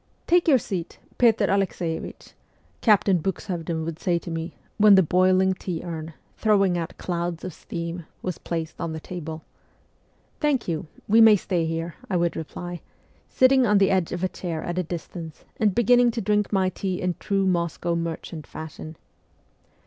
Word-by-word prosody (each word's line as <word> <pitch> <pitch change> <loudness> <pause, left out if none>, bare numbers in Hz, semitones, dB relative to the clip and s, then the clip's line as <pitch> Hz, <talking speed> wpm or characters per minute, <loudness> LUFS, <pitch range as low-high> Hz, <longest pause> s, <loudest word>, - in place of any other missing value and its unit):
' - - -41
Take 350 0 +3
your 285 -5 +7
seat, 185 -7 -5 0.2
Petr 225 -4 +4
Alexeievich,' 185 -4 -2 0.5
Captain 200 -4 +4
Bux 190 +3 -3
SIBERIA 175 -4 -4
285 170 - -2
hovden 160 0 -3
would 165 0 -5
say 175 -2 +1
to 170 - -6
me, 165 +1 -4 0.2
when 205 -1 +8
the 190 - +6
boiling 185 +2 +3
tea 180 -3 -5
urn, 160 -2 -6 0.3
throwing 200 -4 +3
out 170 -1 -4
clouds 170 -1 -3
of 185 - -5
steam, 170 +1 -6 0.2
was 180 -2 -3
placed 165 -1 -4
on 165 -2 -3
the 160 - -5
table. 160 -2 -7 0.5
' - - -39
Thank 290 -6 +1
you; 165 -2 -2 0.2
we 225 +2 +6
may 220 -1 +9
stay 175 -4 -1
here,' 165 +1 -3 0.2
I 185 - +1
would 170 -1 0
reply, 175 +2 -6 0.5
sitting 260 -1 +4
on 210 0 +4
the 195 -1 +4
edge 185 -3 +1
of 180 +1 -3
a - - +3
chair 170 -3 -5
at 175 +1 -2
a - - +1
distance, 165 -1 -7
and 210 -4 +2
beginning 245 +1 +5
to - - +2
drink 210 +1 +1
my 190 -2 +2
tea 185 0 -3
in 180 -1 0
true 195 -1 0
Moscow 170 -1 0
merchant 165 -2 -5
fashion. 160 0 -8
180 Hz, 185 wpm, -25 LUFS, 165-195 Hz, 0.5 s, may